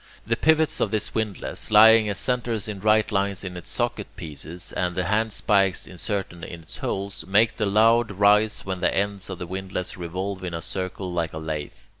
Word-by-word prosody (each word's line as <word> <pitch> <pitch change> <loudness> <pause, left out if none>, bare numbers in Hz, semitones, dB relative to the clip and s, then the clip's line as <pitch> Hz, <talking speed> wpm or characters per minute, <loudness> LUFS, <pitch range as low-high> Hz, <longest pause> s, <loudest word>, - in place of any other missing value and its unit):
The 115 - +1
pivots 160 +4 +3
of - - +1
this 110 -1 -1
windlass, 110 -3 -3
lying 110 0 +7
as 100 - -2
centres 120 -2 -1
in 105 -2 -5
right 110 +2 +3
lines 100 -1 0
in 90 -2 -6
its 90 - -8
socket - - -1
pieces, 80 +3 -7
and 90 -1 -2
the 90 - 0
handspikes 100 -1 +1
inserted 95 -2 -4
in 85 0 -8
its - - -10
holes, 100 +1 -4
make 105 +4 +3
the 110 - 0
load 115 +3 +4
rise 105 +2 +3
when 95 -1 -3
the 90 - +1
ends 100 -1 -1
of 95 - -5
the 90 - -5
windlass 95 0 -5
revolve 95 +2 -4
in 90 -2 -4
a - - -3
circle 95 -1 -3
like 85 -2 -2
a - - -5
lathe. 80 -2 -5
100 Hz, 195 wpm, -24 LUFS, 90-110 Hz, -, lying